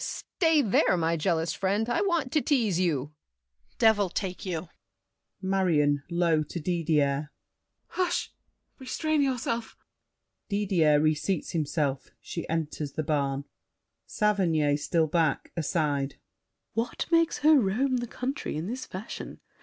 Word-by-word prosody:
stay 320 Hz, -4 st, +1 dB
there, 195 Hz, -4 st, +3 dB
my 165 Hz, 0 st, +1 dB
jealous 165 Hz, 0 st, 0 dB
friend, 200 Hz, +4 st, 0 dB
I 240 Hz, -, +1 dB
want 340 Hz, -10 st, 0 dB
to 305 Hz, -, +2 dB
tease 225 Hz, -, +1 dB
you! 150 Hz, -5 st, 0 dB, 0.6 s
DIDIER. -, -, -38 dB
Devil 215 Hz, -4 st, +4 dB
take 185 Hz, +1 st, -4 dB
you! 170 Hz, -1 st, -3 dB, 0.8 s
MARION 165 Hz, -7 st, +2 dB
(low 170 Hz, -2 st, +2 dB
to 160 Hz, +3 st, -5 dB
Didier). 150 Hz, -4 st, 0 dB, 0.6 s
Hush! 360 Hz, -1 st, -1 dB, 0.5 s
Restrain 310 Hz, +3 st, 0 dB
yourself. 235 Hz, -4 st, -1 dB, 0.7 s
[Didier 185 Hz, -8 st, +3 dB
re 155 Hz, +1 st, +3 dB
seats 165 Hz, +3 st, -2 dB
himself; 150 Hz, -3 st, -1 dB
she 170 Hz, -, -6 dB
enters 155 Hz, -3 st, -3 dB
the 155 Hz, -, -2 dB
barn. 140 Hz, -2 st, -1 dB, 0.6 s
SAVERNY 170 Hz, -9 st, +2 dB
(still 160 Hz, +2 st, +1 dB
back, 160 Hz, -2 st, 0 dB
aside). 145 Hz, -4 st, -1 dB, 0.6 s
What 230 Hz, +1 st, -2 dB
makes 330 Hz, -1 st, +3 dB
her 310 Hz, -2 st, +7 dB
roam 250 Hz, +5 st, +1 dB
the 240 Hz, 0 st, -3 dB
country 260 Hz, -, -4 dB
in 155 Hz, -, -3 dB
this 245 Hz, +6 st, -5 dB
fashion? 190 Hz, +4 st, -7 dB
180 Hz, 130 wpm, -28 LUFS, 155-230 Hz, 0.8 s, her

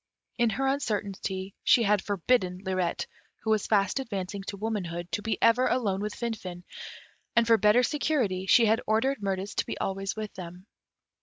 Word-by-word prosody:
In 235 Hz, -1 st, +4 dB
her 265 Hz, +6 st, -1 dB
uncertainty, 200 Hz, -7 st, -2 dB
she 235 Hz, -, +5 dB
had 205 Hz, -1 st, +3 dB
forbidden 195 Hz, -1 st, +1 dB
Lirette, 185 Hz, -2 st, -1 dB, 0.4 s
who 220 Hz, -, 0 dB
was 215 Hz, -2 st, +1 dB
fast 200 Hz, +3 st, +2 dB
advancing 200 Hz, -6 st, -4 dB
to 200 Hz, -, -5 dB
womanhood, 185 Hz, -5 st, -3 dB
to -, -, -1 dB
be 225 Hz, -, -1 dB
ever 235 Hz, +3 st, +5 dB
alone 205 Hz, -6 st, 0 dB
with 210 Hz, 0 st, -3 dB
Finfin, 190 Hz, -7 st, -5 dB, 0.7 s
and 235 Hz, -, +5 dB
for 230 Hz, 0 st, +5 dB
better 210 Hz, +5 st, +5 dB
security 245 Hz, -11 st, 0 dB
she 230 Hz, +4 st, +6 dB
had 225 Hz, +2 st, +3 dB
ordered 225 Hz, +4 st, +1 dB
Mirtis 195 Hz, 0 st, -2 dB
to -, -, +1 dB
be -, -, -4 dB
always 195 Hz, 0 st, -2 dB
with 215 Hz, -1 st, -5 dB
them. 180 Hz, 0 st, -9 dB
210 Hz, 170 wpm, -28 LUFS, 190-230 Hz, 0.7 s, she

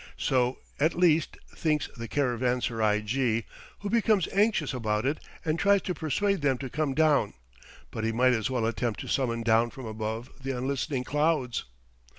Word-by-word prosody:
So, 125 Hz, -1 st, +1 dB, 0.2 s
at 155 Hz, +4 st, +2 dB
least, 165 Hz, -3 st, +3 dB, 0.2 s
thinks 155 Hz, -2 st, 0 dB
the 115 Hz, -2 st, -6 dB
caravanserai 120 Hz, -4 st, 0 dB
jee, 115 Hz, 0 st, 0 dB, 0.4 s
who 205 Hz, -, -3 dB
becomes 220 Hz, -5 st, +3 dB
anxious 200 Hz, -8 st, +2 dB
about 110 Hz, -3 st, -1 dB
it 145 Hz, +3 st, 0 dB, 0.3 s
and 160 Hz, +1 st, 0 dB
tries 200 Hz, -1 st, +4 dB
to 180 Hz, -, -2 dB
persuade 185 Hz, +4 st, 0 dB
them 135 Hz, -3 st, +2 dB
to 130 Hz, -1 st, -6 dB
come 150 Hz, -3 st, -1 dB
down; 150 Hz, -, +3 dB, 0.6 s
but 110 Hz, -, -4 dB
he 110 Hz, -, +1 dB
might 125 Hz, +2 st, +3 dB
as 110 Hz, +2 st, 0 dB
well 125 Hz, -3 st, 0 dB
attempt 115 Hz, 0 st, -1 dB
to -, -, -7 dB
summon 115 Hz, -4 st, 0 dB
down 115 Hz, +1 st, +3 dB
from 130 Hz, +1 st, -9 dB
above 110 Hz, +3 st, -4 dB
the 135 Hz, -1 st, -3 dB
unlistening 130 Hz, +1 st, -2 dB
clouds. 150 Hz, -3 st, 0 dB
130 Hz, 165 wpm, -28 LUFS, 115-155 Hz, 0.6 s, tries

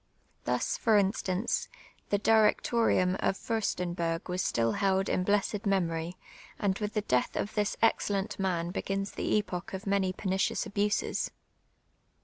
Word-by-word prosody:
Thus, -, -, 0 dB
for 220 Hz, -2 st, +4 dB
instance, 200 Hz, -, 0 dB, 0.4 s
the 205 Hz, -, +3 dB
D'trec 215 Hz, 0 st, +4 dB
torium 190 Hz, -6 st, +2 dB
of 195 Hz, -, +1 dB
Fiirstenberg 175 Hz, -6 st, -2 dB
was 180 Hz, +1 st, -1 dB
still 115 Hz, -8 st, +1 dB
held 195 Hz, -, +1 dB
in 180 Hz, -, +1 dB
blessed 205 Hz, +1 st, +1 dB
memorv, 170 Hz, -3 st, 0 dB, 0.4 s
and 195 Hz, -2 st, +1 dB
with 210 Hz, +1 st, -3 dB
the 210 Hz, -, +2 dB
death 125 Hz, -11 st, 0 dB
of 205 Hz, -, -2 dB
this 210 Hz, -1 st, 0 dB
excellent 200 Hz, -4 st, +1 dB
man 175 Hz, -3 st, 0 dB
begins 195 Hz, +1 st, -2 dB
the -, -, -1 dB
epoch 190 Hz, -2 st, -3 dB
of 190 Hz, -, -7 dB
many 195 Hz, -2 st, +1 dB
peniicious 190 Hz, 0 st, -1 dB
abuses. 205 Hz, +1 st, 0 dB
195 Hz, 140 wpm, -30 LUFS, 180-210 Hz, 0.4 s, for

